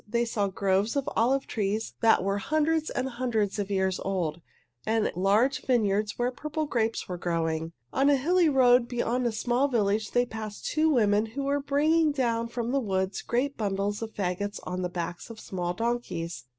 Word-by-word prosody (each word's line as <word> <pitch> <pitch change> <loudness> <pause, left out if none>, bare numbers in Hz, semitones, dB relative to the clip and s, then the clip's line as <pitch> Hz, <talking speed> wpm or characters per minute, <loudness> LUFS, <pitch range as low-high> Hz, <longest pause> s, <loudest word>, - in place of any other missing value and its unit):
They 235 +2 +1
saw 210 -3 0
groves 195 +3 0
of 280 -1 -1
olive 265 +4 +2
trees 215 0 -2
that 225 -5 +4
were 195 +1 0
hundreds 310 +5 +1
and 255 - -2
hundreds 235 -5 -1
of 200 -1 -2
years 190 -2 0
old, 170 -4 -2 0.4
and 220 0 +1
large 205 +9 +2
vineyards 210 -4 +1
where 245 +1 0
purple 305 +4 -3
grapes 230 -5 -1
were 180 -1 -5
growing. 165 -1 -1 0.2
On 275 +2 +3
a 285 - +5
hilly 340 +5 +3
road 250 -3 +5
beyond 245 0 0
a - - 0
small 245 +5 +1
village 215 -4 0
they 245 0 +2
passed 220 -3 -7
two 315 +1 +2
women 215 -5 +3
who 275 +6 -5
were 280 +1 +1
bringing 300 +3 +2
down 235 -4 0
from 235 0 -3
the 275 - +2
woods 190 -4 -1
great 265 +4 -1
bundles 205 0 -1
of 225 -1 -6
fagots 200 +1 -2
on 180 0 -4
the 180 - -2
backs 175 +2 -5
of 225 -1 -9
small 175 -3 -3
donkeys. 225 - -3
225 Hz, 185 wpm, -27 LUFS, 195-255 Hz, 0.4 s, a